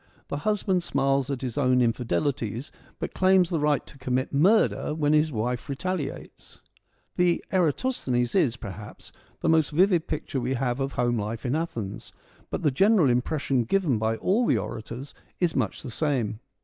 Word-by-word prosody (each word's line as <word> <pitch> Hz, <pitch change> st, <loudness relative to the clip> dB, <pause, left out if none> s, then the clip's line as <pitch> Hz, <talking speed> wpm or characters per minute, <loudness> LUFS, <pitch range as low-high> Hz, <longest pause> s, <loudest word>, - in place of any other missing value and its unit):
The 145 Hz, -, -2 dB
husband 195 Hz, +1 st, 0 dB
smiles 135 Hz, -3 st, 0 dB
at 135 Hz, -2 st, -3 dB
his 125 Hz, +1 st, -3 dB
own 125 Hz, -2 st, +3 dB
infidelities, 115 Hz, -, -1 dB, 0.3 s
but -, -, -5 dB
claims 185 Hz, -1 st, +4 dB
the 165 Hz, -, +1 dB
right 150 Hz, -1 st, +1 dB
to 135 Hz, -, -14 dB
commit 130 Hz, +1 st, -1 dB
murder 170 Hz, 0 st, +3 dB
when 150 Hz, -1 st, +2 dB
his 155 Hz, +1 st, +3 dB
wife 125 Hz, +2 st, -2 dB
retaliates. 145 Hz, +1 st, -5 dB, 0.6 s
The 180 Hz, -1 st, +2 dB
Eratosthenes 150 Hz, -, 0 dB
is, 135 Hz, -11 st, +2 dB
perhaps, 105 Hz, -1 st, -9 dB, 0.3 s
the -, -, +1 dB
most 160 Hz, -2 st, +4 dB
vivid 175 Hz, +1 st, +3 dB
picture 145 Hz, -3 st, -3 dB
we 130 Hz, +2 st, -1 dB
have 125 Hz, 0 st, -1 dB
of 135 Hz, 0 st, -2 dB
home 120 Hz, -1 st, +1 dB
life 110 Hz, +4 st, -4 dB
in 125 Hz, +3 st, 0 dB
Athens, 115 Hz, -, -4 dB, 0.4 s
but -, -, -4 dB
the 150 Hz, -, +3 dB
general 190 Hz, -, +4 dB
impression 130 Hz, +1 st, 0 dB
given 150 Hz, -, +1 dB
by 110 Hz, +1 st, 0 dB
all 220 Hz, -, +1 dB
the -, -, +3 dB
orators 120 Hz, +4 st, -6 dB, 0.3 s
is 175 Hz, -3 st, +1 dB
much 115 Hz, -8 st, -1 dB
the 130 Hz, -, -6 dB
same. 120 Hz, -6 st, -1 dB
140 Hz, 165 wpm, -26 LUFS, 120-165 Hz, 0.6 s, claims